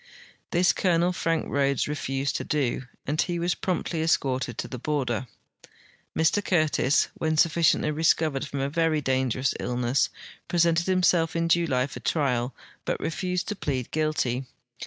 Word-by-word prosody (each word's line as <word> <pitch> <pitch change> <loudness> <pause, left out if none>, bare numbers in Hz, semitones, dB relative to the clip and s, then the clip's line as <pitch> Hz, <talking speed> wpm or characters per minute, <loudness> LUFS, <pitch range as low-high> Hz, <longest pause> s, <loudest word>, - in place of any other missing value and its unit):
This 175 +2 +3
Colonel 175 -1 +2
Frank 165 -2 0
Rhodes 140 -1 +1
refused 135 -2 -2
to - - -4
do, 135 -4 -1 0.2
and 150 +4 +1
he 175 -2 -1
Avas 175 +1 0
jn'omptly 175 -3 -2
escorted 130 -6 0
to - - -3
the 125 - -7
border. 130 -4 -1 0.9
Mr 160 +6 +2
Curtis, 155 -6 +2
when 155 0 -1
sufficiently 160 -1 +3
recovered 155 -2 +1
from 140 -1 -4
a 135 - 0
very 160 +1 +1
dangerous 130 -1 0
illness, 125 +2 0 0.4
])resented 170 0 +3
himself 180 -3 +2
in 165 0 +1
July 165 -7 +2
for 140 - -8
trial, 125 -5 0 0.3
but - - -2
refused 180 +2 -2
to 210 - -2
plead 135 - -3
guilty. 150 -5 0
155 Hz, 145 wpm, -26 LUFS, 130-170 Hz, 0.9 s, This